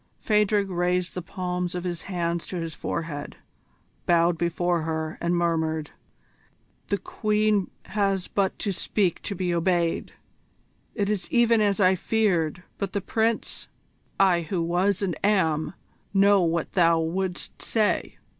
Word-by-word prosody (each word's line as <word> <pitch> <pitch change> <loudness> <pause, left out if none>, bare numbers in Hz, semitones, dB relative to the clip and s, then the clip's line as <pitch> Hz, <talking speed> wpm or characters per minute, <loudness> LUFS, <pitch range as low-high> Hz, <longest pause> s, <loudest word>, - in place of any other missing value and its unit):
Phadrig 210 -1 +2
raised 180 0 0
the 180 - -4
palms 180 0 -3
of 180 - -3
his 175 -2 -3
hands 170 -3 -2
to - - -5
his 165 -2 -3
forehead, 150 -4 -4 0.7
bowed 170 0 +4
before 170 0 0
her, 160 0 -3
and 170 +1 +1
murmured: 160 -2 0 1.0
"The 200 - +1
Queen 210 -2 0 0.2
has 195 -3 0
but 195 -2 0
to 205 - -2
speak 185 -1 0
to 200 - -4
be 180 -1 -1
obeyed! 170 -1 0 0.8
It 205 -3 0
is 205 -2 -2
even 235 -2 +4
as 205 0 +2
I 185 -1 +5
feared. 180 -4 0 0.2
But 195 -2 -3
the 200 - -1
Prince 225 +3 -1 0.3
" - - -39
"I 170 - +1
who 170 +1 -2
was 180 +4 +1
and 180 -4 -1
am, 175 -6 +2 0.4
know 200 0 +5
what 170 -1 0
thou 170 -2 +4
wouldst 180 +3 -3
say. 215 -2 0
180 Hz, 145 wpm, -25 LUFS, 170-200 Hz, 1.0 s, I